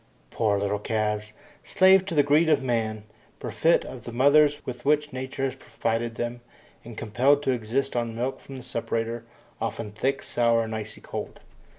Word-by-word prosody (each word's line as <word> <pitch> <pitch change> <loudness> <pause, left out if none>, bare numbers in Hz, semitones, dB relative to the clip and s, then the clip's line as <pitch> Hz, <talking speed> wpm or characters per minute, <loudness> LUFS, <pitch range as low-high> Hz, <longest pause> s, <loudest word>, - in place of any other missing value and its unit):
Poor 105 -3 +1
little 100 +1 -1
calves! 105 0 -1 0.3
Slaves 190 0 +5
to 180 -4 -4
the 145 - +5
greed 150 +3 +4
of 155 - +3
man! 110 -4 -1 0.4
Bereft 165 +1 +2
of 125 -3 -9
the 120 - -6
mothers 145 +4 +4
with 125 -1 -6
which 150 0 +2
Nature 130 +1 -4
has 135 -1 0
provided 115 -3 -2
them, 120 +1 -4 0.4
and 115 -2 -10
compelled 130 +6 +2
to 135 - +2
exist 125 +3 -1
on 115 -2 -1
milk 125 +3 -2
from 135 - -11
the 130 - -8
separator, 115 -1 -3 0.4
often 110 -3 -3
thick, 135 +6 -1
sour, 115 -1 +2
and 110 0 -5
icy 110 0 -6
cold. - - -6
120 Hz, 175 wpm, -26 LUFS, 115-140 Hz, 0.4 s, Slaves